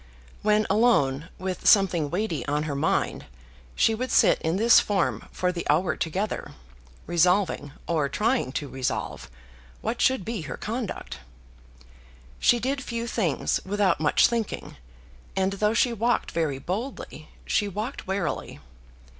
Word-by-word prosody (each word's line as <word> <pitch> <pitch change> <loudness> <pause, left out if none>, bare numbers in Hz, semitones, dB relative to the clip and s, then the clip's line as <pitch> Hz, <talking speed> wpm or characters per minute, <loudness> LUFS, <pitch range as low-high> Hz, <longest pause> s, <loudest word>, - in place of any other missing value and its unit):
When 215 0 +3
alone 165 - +2
with 185 0 -4
something 185 -8 +4
weighty 180 -3 -2
on 150 +1 0
her 155 -2 -3
mind 140 - -1 0.5
she 225 - +3
would 255 +4 -3
sit - - +4
in 160 +2 0
this 230 +3 +7
form 195 -4 -1
for 180 0 0
the 175 -1 -4
hour 170 +5 +2
together, 190 +6 -3 0.5
resolving, 175 -4 +1
or 155 -4 +1
trying 225 - 0
to 145 - -3
resolve, 130 -1 -4 0.5
what 225 +2 -2
should 260 -7 +2
be 225 -3 -3
her 155 - -6
conduct. 225 - -5 1.2
She 240 - +4
did 270 +3 -2
few 235 -1 -3
things 210 - 0
without 200 0 +1
much 150 -2 +4
thinking, 230 -3 -2 0.6
and 190 0 +1
though 210 +2 +1
she 240 0 +3
walked 230 +1 0
very 160 -5 -1
boldly, 210 - -5 0.2
she 205 - +1
walked 215 +7 -5
warily. 190 -3 -3
195 Hz, 140 wpm, -26 LUFS, 165-225 Hz, 1.2 s, this